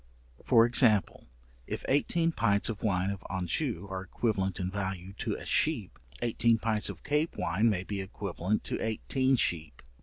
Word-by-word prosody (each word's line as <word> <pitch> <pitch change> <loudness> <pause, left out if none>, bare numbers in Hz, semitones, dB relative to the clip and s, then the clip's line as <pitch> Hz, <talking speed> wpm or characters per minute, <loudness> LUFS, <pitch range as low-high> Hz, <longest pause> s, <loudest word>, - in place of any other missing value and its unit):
For 115 0 +6
example, 115 - +3 0.4
if - - -5
eighteen 165 +4 +2
pints 105 -8 +1
of 110 -3 -4
wine 95 -2 +1
of 100 -1 -7
Anjou 95 - -2
are 95 0 -3
equivalent 95 -1 -1
in 90 0 -2
value 95 -1 -4
to - - -1
a - - -8
sheep, 145 - 0 0.2
eighteen 115 0 +3
pints 110 -1 -1
of - - -8
Cape 150 +3 0
wine 95 +6 +2
may 95 -4 0
be 100 0 -4
equivalent 95 +1 -3
to - - -2
eighteen 130 +4 +1
sheep. 80 - -2
105 Hz, 160 wpm, -30 LUFS, 95-115 Hz, 0.4 s, For